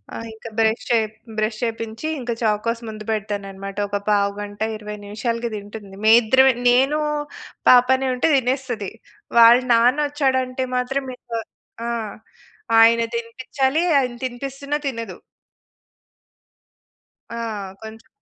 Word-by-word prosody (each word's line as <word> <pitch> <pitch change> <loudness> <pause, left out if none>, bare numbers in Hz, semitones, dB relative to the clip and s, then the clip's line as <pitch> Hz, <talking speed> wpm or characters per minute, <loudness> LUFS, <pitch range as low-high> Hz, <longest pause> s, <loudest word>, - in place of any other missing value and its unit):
ఆహ్, 230 - -6
ఇంక 220 +1 -11
brush 220 0 +2
చేప్ 220 -2 +1 0.2
brush 215 0 -1
చేపించి 225 +3 -4
ఇంక 245 -2 -4
చాకోస్ 230 +2 0
ముందు 215 -1 -8
పెడతానన్నమాట. 195 -2 -4
ఒక 205 0 -1
పావుగంట, 205 0 -1 0.2
20 210 -1 -7
నిమిషాలకి 230 +3 -3
తింటుంది. 205 -1 -9
మేమిద్దరమే 240 +4 +6 0.2
నేను 270 +5 +3 0.7
పాపనే 260 +1 +5
ఉంటే 250 +6 +1
తినేస్తది. 250 -5 -1 0.5
వాళ్ళ 235 +1 +9
నాన్నొచ్చాడంటే 260 0 +1
మాత్రం 270 +2 -1
ఇంక - - -28 0.6
ఆ! - - -1 0.9
ఆయన 230 +1 +6
తినిపించాలి. 260 +5 -1 0.2
ఆయన 250 -2 -1
తినిపిస్తున్నా 275 +3 -4
తినదు. 230 -3 -5 2.1
ఆ! - - -6 0.5
కొంచెం. 220 +1 -11
230 Hz, 105 wpm, -21 LUFS, 215-260 Hz, 2.1 s, వాళ్ళ